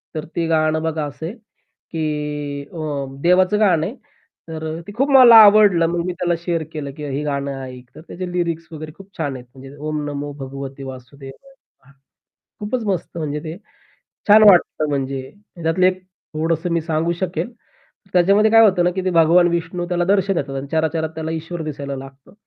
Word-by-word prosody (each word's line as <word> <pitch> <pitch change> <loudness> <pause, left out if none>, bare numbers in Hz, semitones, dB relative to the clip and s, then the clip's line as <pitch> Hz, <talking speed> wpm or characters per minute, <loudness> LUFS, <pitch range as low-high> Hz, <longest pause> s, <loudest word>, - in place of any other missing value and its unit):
तर 155 - -4
ते 165 -1 0
गाणं 155 -1 +1
बघा 160 -2 -2
असंय 160 +5 -6 0.6
की 160 -1 -3 0.7
अ, 150 -4 -3 0.2
देवाचं 185 +3 +3
गाणं 175 -7 +3
आहे 225 - -5 0.5
तर 160 -1 -6
अ, - - -7
ते - - -7
खूप 275 +3 +1
मला 250 -4 +9
आवडलं. 205 -5 +6
मग 170 0 -2
मी 180 - -2
त्याला 175 0 -1
शेअर 170 -2 -1
केलं 145 -3 -5
की 150 - -6
हे 140 +1 -3
गाणं 140 -2 -3
ऐक. 125 -1 -10
तर - - -11
त्याचे 180 0 -6
लिरिक्स 170 -2 -2
वगैरे 155 -1 -8
खूप 195 0 -16
छान 140 -2 -2
आहेत. 125 - -10
म्हणजे 135 +1 -12
"ओम 150 0 -4
नमो 145 0 -5
भगवते 135 0 -7
वासुदेव 135 +1 -10
नम:" 270 - -24 0.7
खूपच 220 +3 -3
मस्त 185 -3 -3
म्हणजे 150 -2 -3
ते 160 +1 -6 0.7
छान 215 +1 +8
वाटतं 165 -4 +2
म्हणजे 135 -1 -2 0.4
त्यातले 165 +3 +2
एक 185 0 -4 0.3
थोडंसं 165 +2 -1
मी 170 - +1
सांगू 160 +1 -1
शकेल. 185 +6 -3 0.6
त्याच्यामध्ये 195 +4 +4
काय 225 0 +7
होतं 190 -5 +4
ना, 180 - +3
की 190 - -2
ते 185 - +1
भगवान 170 +1 +5
विष्णू 170 +1 -3
त्याला 175 -1 0
दर्शन 195 +1 +2
देतात 140 -4 -3
आणि 135 - -5
चरा-चरात 160 0 0
त्याला 160 0 -4
ईश्वर 165 +1 -5
दिसायला 140 -2 -5
लागतं. 135 +3 -12
165 Hz, 180 wpm, -20 LUFS, 145-180 Hz, 0.7 s, मला